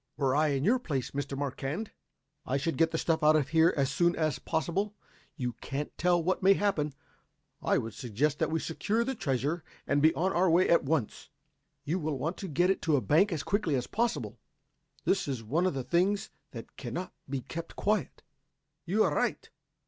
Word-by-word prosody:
"Were 135 -2 +1
I 155 +1 +3
in 140 -2 0
your 240 +8 +3
place, 140 - -3
Mr. 140 -1 -4
Marquand, 145 - -3 0.5
I 135 - -1
should 160 +4 -1
get 165 0 +3
the 160 - -2
stuff 160 0 0
out 155 +1 +5
of 145 -3 +1
here 160 +2 +5
as 135 -2 +1
soon 175 0 +2
as 155 -4 0
possible. 175 +6 -1 0.4
You 125 -5 -3
can't 145 +1 -4
tell 175 -1 +2
what 185 +3 0
may 195 +1 +6
happen. 165 -8 0 0.7
I - - +2
would 115 -1 -3
suggest 135 +5 -1
that - - +1
we 160 - 0
secure 215 +7 -1
the 265 +3 -2
treasure 150 - -1 0.2
and 145 0 +1
be 155 +2 +6
on 190 +3 +1
our 180 +1 +3
way 175 +3 +4
at 170 - +4
once. 140 -6 -2 0.5
You 160 +6 -1
will 155 -3 -2
want 160 +7 -3
to 195 - -5
get 175 +4 +2
it 195 - -2
to 160 -2 +2
a - - +3
bank 165 - +3
as 155 -4 -2
quickly 200 -8 0
as 125 -1 -1
possible. 235 +1 -2 0.7
This 195 - +1
is 130 -5 -3
one 160 +12 +1
of 180 - -1
the 135 - -2
things 180 +9 +1 0.2
that 115 -2 -10
cannot 140 +9 -5 0.2
be 135 -1 -2
kept 165 +7 -7
quiet." 205 -7 -1 0.6
"You 210 +5 +3
are - - +1
right. - - -1
160 Hz, 200 wpm, -30 LUFS, 140-185 Hz, 0.7 s, may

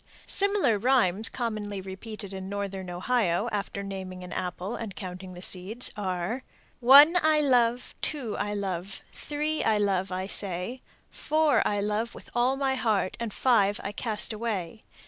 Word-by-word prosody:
Similar 400 - +2
rhymes 225 -4 +3
commonly 215 -4 -3
repeated 195 +1 -7
in 190 0 -6
northern 195 -2 -4
Ohio, 190 +1 0
after 200 -1 -3
naming 190 -2 -6
an 180 - -8
apple 185 +3 -4
and 215 -5 -6
counting 185 -1 -7
the 180 - -9
seeds, 195 +8 0
are, 190 +4 -2 0.4
One 285 +7 +8
I 310 -1 +4
love, 245 -4 +2
Two 270 -8 -2
I 205 0 -2
love, 195 -1 -4
Three 300 +1 -2
I 220 -1 +3
love, 195 -2 0
I 185 +1 -2
say. 195 +5 -3 0.3
Four 310 -2 +2
I 205 -1 0
love 210 +3 -2
with - - -12
all 245 +2 +2
my 270 -1 0
heart, 220 -7 0
And 235 -2 -3
five 205 -4 +2
I 200 - -3
cast 215 0 0
away. 215 -3 -4
210 Hz, 155 wpm, -27 LUFS, 190-245 Hz, 0.4 s, One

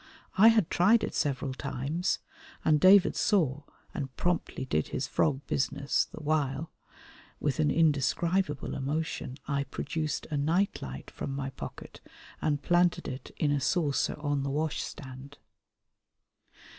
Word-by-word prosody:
I 210 +3 +7
had 220 -6 +4
tried 215 +6 +4
it - - -3
several 135 -2 -1
times, 140 +6 -2 0.5
and 155 -1 +4
David 190 +3 +6
saw 150 - +2 0.3
and 135 -2 -5
promptly 175 -6 -1
did 75 -11 0
his - - -2
frog 140 -3 +1
business, 140 +1 0
the - - -11
while, 150 0 0 0.7
with 145 +1 -1
an 155 -1 +3
indescribable 160 +2 +1
emotion, 140 -1 -3
I 140 -1 0
produced 155 +1 -3
a 150 - 0
night 170 +8 +1
light 65 0 -7
from 135 - -5
my 135 -1 -3
pocket - - -9 0.4
and 145 -2 0
planted 175 +2 +2
it 130 -1 -6
in 150 - +1
a 145 -1 +1
saucer 150 -5 +1
on 145 -2 0
the 140 - -2
wash 150 +2 -1
stand. 135 +1 -9
145 Hz, 140 wpm, -29 LUFS, 135-165 Hz, 0.7 s, I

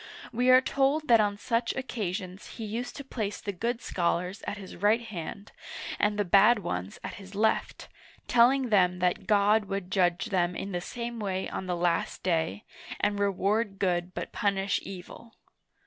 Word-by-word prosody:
We 250 +2 +2
are 255 0 +8
told 280 +3 +1
that 230 -1 +7
on 205 -1 0
such 230 +3 -1
occasions 195 -7 -4
he 225 - -4
used 240 +3 -4
to 280 - -6
place 215 -6 -4
the 205 - -4
good 230 +6 -3
scholars 180 +2 -1
at 205 - -3
his 195 -2 -9
right 210 +5 +3
hand, 200 -1 -7 0.5
and 210 0 +2
the 205 - +1
bad 200 +6 +6
ones 95 - -4
at - - -5
his 195 +1 -12
left, 220 +2 0 0.4
telling 250 +2 +4
them 180 -4 +4
that 180 0 0
God 210 +1 +4
would 195 -2 -4
judge 185 +3 +1
them 175 -2 +1
in 195 - -4
the 175 -1 -2
same 235 +4 -5
way 190 -2 -2
on 190 - -5
the 180 -1 -1
Last 170 -1 0
Day, 165 +2 0 0.4
and 205 0 +1
reward 200 +1 +1
good 180 -2 -1
but - - -4
punish 200 -1 0
evil. 195 +4 -10
200 Hz, 175 wpm, -28 LUFS, 185-230 Hz, 0.5 s, are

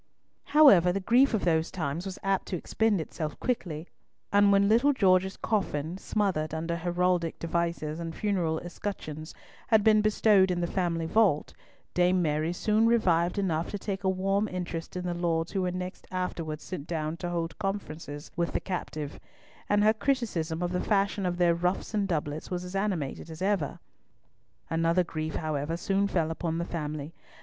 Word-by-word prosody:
However, 240 - +7
the 195 - -1
grief 240 +6 +4
of 205 - -1
those 160 -2 +2
times 165 +1 -3
was 190 - -6
apt 195 -1 0
to 185 - -2
expend 220 +3 +1
itself 155 -1 -5
quickly, 175 -10 -2 0.5
and 205 0 +6
when 200 0 +4
little 240 +7 +4
George's 190 -5 +3
coffin, 175 -7 -1
smothered 185 -9 -1
under 165 +1 -2
heraldic 175 0 0
devices 170 -2 -2
and 165 -1 -5
funeral 180 -6 0
escutcheons, 165 -4 -6 0.3
had 220 -2 +4
been 215 -1 +5
bestowed 210 -2 +4
in 180 -1 0
the 175 - 0
family 170 -2 -1
vault, 185 -4 +2 0.4
Dame 180 +1 +3
Mary 155 -1 0
soon 215 +5 +2
revived 180 -6 +2
enough 170 -5 0
to 205 - -3
take 200 0 -4
a 190 - +2
warm 195 +3 +1
interest 180 -3 -5
in 180 0 -3
the 175 - -1
lords 170 -1 -1
who 195 - -1
were 180 -1 0
next 180 +1 -6
afterwards 170 -4 -3
sent 165 -5 -6
down 155 -1 -2
to 175 0 -4
hold 165 0 -3
conferences 165 -7 -5
with 170 -1 -1
the - - +1
captive; 155 -5 -5 0.5
and 205 0 +3
her 215 +1 +5
criticism 205 - -1
of 175 - -1
the 180 - -1
fashion 200 -2 +1
of 175 0 -2
their 175 -1 +4
ruffs 180 +5 -1
and 205 -2 +1
doublets 155 -3 -3
was 180 -1 -3
as 180 +2 -7
animated 180 -7 -2
as 160 0 -8
ever. 190 -5 0 0.9
Another 165 +2 +2
grief, 155 -2 -4
however, 155 +1 -2
soon 195 +3 +1
fell 165 -5 0
upon 165 0 -2
the 170 - -1
family. 150 -2 -4
180 Hz, 175 wpm, -28 LUFS, 165-195 Hz, 0.9 s, However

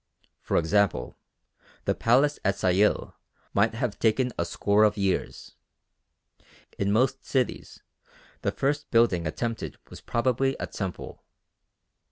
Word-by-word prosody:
For - - 0
example 100 +5 +1 0.7
the - - +2
Palace 135 +6 +2
at 100 0 +1
Sayil 95 +3 +1 0.4
might 110 +3 +2
have 115 -3 -3
taken 125 +3 +2
a 85 - -1
score 100 +4 +2
of 105 0 +3
years. 100 -2 -2 1.3
In 100 0 +1
most 130 +5 +1
cities 130 -3 -2 0.6
the - - 0
first 145 +2 -1
building 105 -8 +3
attempted 115 +9 -4
was - - -10
probably 130 +2 0
a - - -2
temple. 95 -3 -6
110 Hz, 120 wpm, -26 LUFS, 100-125 Hz, 1.3 s, of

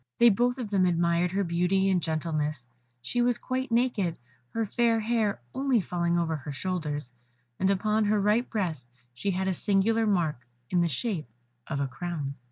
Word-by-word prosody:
They 235 - +7
both 245 +5 +1
of 230 -5 -5
them 190 -2 +3
admired 170 0 +2
her 200 +1 +1
beauty 180 +2 +1
and 185 -2 +2
gentleness; 155 -4 -2 0.4
she 240 - 0
was 240 -1 +3
quite 260 +1 -3
naked, 230 -8 +1 0.3
her 225 - -1
fair 230 +1 +2
hair 220 -2 0
only 265 -3 +2
falling 175 -2 0
over 165 -2 0
her 145 +1 -7
shoulders, 150 -4 -3 0.5
and 190 - +2
upon 210 +2 +2
her 210 0 +2
right 210 +5 +2
breast 165 - -2 0.3
she 200 +11 -3
had 190 0 0
a 190 - +2
singular 215 +4 +2
mark 170 - +1 0.3
in 180 - +3
the 170 - +3
shape 165 - -2 0.4
of 140 - -2
a 140 - 0
crown. 140 +1 -4
190 Hz, 175 wpm, -28 LUFS, 165-220 Hz, 0.5 s, They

